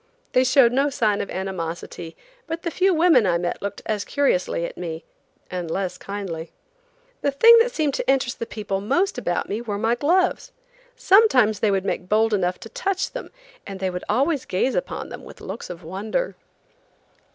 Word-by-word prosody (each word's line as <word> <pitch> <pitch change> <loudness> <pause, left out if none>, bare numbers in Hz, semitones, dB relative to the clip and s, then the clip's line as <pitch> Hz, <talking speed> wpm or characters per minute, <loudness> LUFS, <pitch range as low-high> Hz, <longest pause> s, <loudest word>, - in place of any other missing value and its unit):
They 255 - +4
showed 255 -2 +5
no 275 +3 +2
sign 220 -7 +1
of - - -5
animosity, 170 -3 -5 0.3
but 330 +1 -4
the 335 - -2
few 375 +4 +2
women 320 - +4
I 170 -1 +2
met 175 0 -3
looked 200 0 -5
as 210 -2 -1
curiously 185 -11 0
at - - -7
me, 165 -2 -6 0.5
and 180 -2 -4
less 185 +2 -3
kindly. 185 -5 -6 0.7
The 285 - +2
thing 455 +12 +7
that 475 +2 +3
seemed 305 - 0
to - - -2
interest 265 -3 +1
the 230 - -4
people 200 -3 -3
most 275 - +1
about 175 -7 -1
me 210 +3 -3
were 210 -4 -3
my 225 +3 +1
gloves. 365 - +1 0.4
Sometimes 380 - +4
they 215 - +2
would 195 -1 0
make 180 -1 -3
bold 220 +1 +3
enough 180 -2 0
to - - -9
touch 395 -7 -2
them, - - -7 0.4
and 195 -1 -7
they 190 -1 -1
would 180 0 -5
always 275 +5 +1
gaze 220 +8 0
upon - - -3
them - - -9
with - - -12
looks - - -7
of 175 0 -8
wonder. 205 - -3
220 Hz, 185 wpm, -23 LUFS, 190-290 Hz, 0.7 s, thing